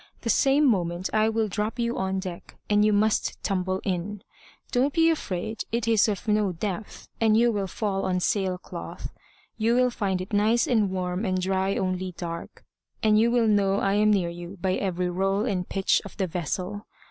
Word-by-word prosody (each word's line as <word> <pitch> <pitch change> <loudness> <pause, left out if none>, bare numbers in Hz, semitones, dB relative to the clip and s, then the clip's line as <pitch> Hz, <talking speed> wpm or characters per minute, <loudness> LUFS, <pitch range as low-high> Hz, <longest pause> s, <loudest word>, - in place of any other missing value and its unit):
The 230 - +2
same 275 +6 +4
moment 180 -6 0
I 215 0 +3
will 225 -1 0
drop 210 +4 -2
you 235 0 -1
on 190 0 -1
deck, 185 -2 -7 0.2
and 210 0 +4
you 215 - +4
must 210 +1 +1
tumble 185 -1 -1
in. 190 +2 -3 0.5
Don't 265 +3 +1
be 330 0 +5
afraid, 215 - -3
it 230 0 -1
is 225 -2 +4
of 210 +2 -3
no 210 -2 +2
depth, 195 +3 -5
and 220 -1 +4
you 235 +1 +4
will 200 -3 -2
fall 195 0 -2
on 180 -1 0
sail 185 0 0
cloth. 85 - -8 0.5
You 230 +2 +2
will 250 0 +3
find 195 -5 -1
it 185 +4 -7
nice 215 +3 +3
and 220 -5 +2
warm 180 +1 -2
and 185 -3 0
dry 190 +1 0
only 185 -1 -2
dark; 170 -1 -7 0.4
and 215 -1 +5
you 230 +2 +4
will 235 -1 +3
know 200 -2 +3
I 195 -1 +1
am 210 +1 +3
near 190 -5 +2
you 175 +3 -8
by 185 +1 0
every 180 -2 -1
roll 195 +3 0
and 185 -6 -2
pitch 195 -1 +2
of 200 - -11
the 195 - +1
vessel. 185 +4 -4
200 Hz, 195 wpm, -26 LUFS, 185-220 Hz, 0.5 s, be